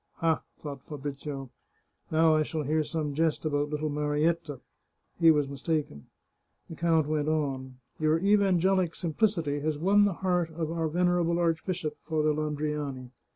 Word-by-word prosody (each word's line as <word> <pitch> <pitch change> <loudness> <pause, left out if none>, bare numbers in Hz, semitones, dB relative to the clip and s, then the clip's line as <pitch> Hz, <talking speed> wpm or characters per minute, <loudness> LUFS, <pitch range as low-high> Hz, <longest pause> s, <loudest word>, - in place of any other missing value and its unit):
" - - -49
Ha! 165 -1 +1
" - - -47
thought 140 -3 -7
Fabrizio, 140 -2 -6 0.3
" - - -42
now 160 0 +4
I 155 - +3
shall 155 0 -2
hear 155 +2 +1
some 150 -2 -3
jest 160 +1 0
about 145 -1 0
little 150 0 -2
Marietta." 150 0 0 0.6
He 165 -1 +7
was 150 -3 +4
mistaken. 140 - -3 0.6
The - - -6
count 165 -2 +2
went 150 0 -1
on: 135 -4 -1
" - - -42
Your 155 0 +3
evangelic 190 -2 +3
simplicity 165 -4 0
has 150 0 -1
won 200 +6 +4
the 200 - +1
heart 180 -2 +2
of 160 -1 -2
our 165 -1 -1
venerable 175 +1 +1
archbishop. 165 -1 -1
Father 155 -1 +1
Landriani. 150 -4 -3
155 Hz, 160 wpm, -28 LUFS, 145-165 Hz, 0.6 s, He